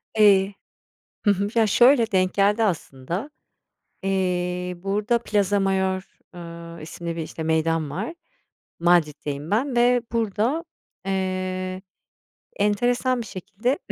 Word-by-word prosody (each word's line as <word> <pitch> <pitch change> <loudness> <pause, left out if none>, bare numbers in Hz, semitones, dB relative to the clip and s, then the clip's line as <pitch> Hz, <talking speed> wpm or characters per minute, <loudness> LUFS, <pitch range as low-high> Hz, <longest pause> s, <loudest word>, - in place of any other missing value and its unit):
Eee 200 -2 +5 0.7
hı 205 - +6
hı. 200 +1 0
Ya, 225 -2 +4
şöyle, 240 +1 +5
denk 185 -1 +2
geldi 205 +3 +3
aslında. 170 - -2 0.7
Eee, 180 -1 -1
burada 205 +6 0
Plaza 205 -3 +1
Mayor, 190 0 -1 0.2
ııı, 170 -1 -9
isimli 170 +1 -6
bir, 165 - -2
işte, 160 - -6
meydan 160 -1 +1
var. 205 - -4 0.7
Madrid'deyim 155 -3 +1
ben 250 +5 +1
ve 245 +1 +4
burada, 230 - 0 0.4
eee, 185 -1 -2 0.8
enteresan 245 +5 +1
bir 230 - -5
şekilde 210 +8 -2
195 Hz, 110 wpm, -24 LUFS, 175-215 Hz, 0.8 s, hı